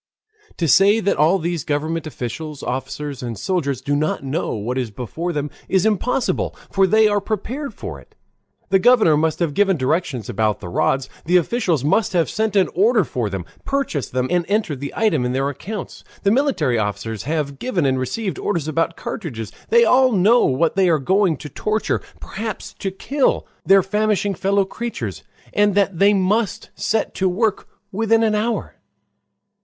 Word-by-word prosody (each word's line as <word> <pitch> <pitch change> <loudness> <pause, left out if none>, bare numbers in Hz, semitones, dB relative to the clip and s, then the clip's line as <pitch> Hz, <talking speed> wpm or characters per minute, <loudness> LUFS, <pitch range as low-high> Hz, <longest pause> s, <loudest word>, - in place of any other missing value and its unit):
To 170 - 0
say 200 - +5
that 200 - 0
all 160 +6 +4
these 170 -3 -2
government 155 +2 -2
officials, 150 +2 -6
officers, 140 +2 -4
and 120 -3 -5
soldiers 140 - -1
do 145 +2 -1
not 150 -1 -1
know 140 +2 -2
what 120 +5 -2
is 125 -3 -2
before 130 +11 -4
them 150 -2 -3 0.2
is 190 0 +2
impossible, 220 +4 0 0.2
for 195 -1 +3
they 220 +3 +5
are 205 -1 +1
prepared 240 +8 -4
for - - -7
it. - - -21 0.5
The 195 0 +4
governor 220 -7 +5
must 155 +1 +1
have 165 -4 -1
given 195 +1 +2
directions 130 - -1
about 110 0 0
the 90 - -7
rods, 135 +9 +1 0.2
the 180 +3 +4
officials 175 - 0
must 190 +7 +2
have 170 -2 +1
sent 220 -1 -1
an 195 -2 +4
order 215 +4 +4
for 125 -6 -3
them, 95 -3 -5 0.2
purchased 275 - -2
them, 125 0 0
and 175 -1 +2
entered 200 -9 0
the 140 +1 -5
item 185 - +2
in 125 0 -1
their 135 +2 0
accounts. 195 - -7 0.2
The 200 - +3
military 220 - +1
officers 105 +1 -3
have 145 -2 -2
given 195 - -1
and 130 -1 +1
received 190 - -3
orders 170 -7 -1
about 165 +1 -1
cartridges. 115 - -5 0.2
They 470 +1 +6
all 255 -1 +4
know 200 - +4
that 165 - +3
they 190 -2 +3
are 160 - +4
going 185 +2 +2
to 150 - -8
torture, 215 +9 -1 0.2
perhaps 220 -1 -6
to 195 - -2
kill, 265 +8 0 0.2
their 195 0 +5
famishing 210 0 0
fellow 195 +1 +1
creatures, 125 - -5 0.3
and 205 -1 +3
that 200 -4 +1
they 205 +1 +5
must 200 +3 0
set 220 - -1
to 190 -1 +1
work 210 +3 0 0.2
within 225 +2 +2
an 220 -1 +2
hour. 220 +2 -2
175 Hz, 180 wpm, -21 LUFS, 140-210 Hz, 0.5 s, They